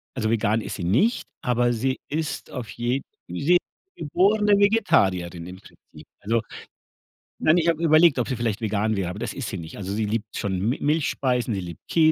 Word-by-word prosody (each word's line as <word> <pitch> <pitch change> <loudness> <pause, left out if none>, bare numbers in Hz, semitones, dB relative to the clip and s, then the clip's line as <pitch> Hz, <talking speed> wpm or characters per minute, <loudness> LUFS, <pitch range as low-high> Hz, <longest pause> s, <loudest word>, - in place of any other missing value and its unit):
also, 110 -4 -1
vegan 110 0 +1
ist - - -5
sie 95 - -5
nicht, 120 - +2 0.2
aber 120 0 +1
sie 130 +3 -1
ist 150 -2 -3
auf 125 -4 -6
je 120 +3 -1 0.3
sie 175 +5 +3 0.4
geborene 205 +6 +3
Vegetarierin 95 - +2
im 90 +1 -9
Prinzip. 75 -4 -17
Also, 115 +2 0 1.0
nein, 155 +2 +4
ich 170 -1 +1
habe 165 -1 +1
überlegt, 160 -2 +5
ob 120 - 0
sie 130 - -1
vielleicht 115 -3 -2
vegan 110 0 0
wäre, 95 -3 -2
aber 95 +3 -6
das 120 - -4
ist 135 -5 -5
sie 100 - -4
nicht. 80 -2 -8
Also, 95 -1 -5
sie 110 +1 0
liebt 110 +1 -3
schon 95 -2 -2
Mi 115 +8 0
Milchspeisen, 130 -6 0
sie - - -2
liebt 85 -2 -8
Kä 160 -1 +5
120 Hz, 195 wpm, -24 LUFS, 100-155 Hz, 1.0 s, überlegt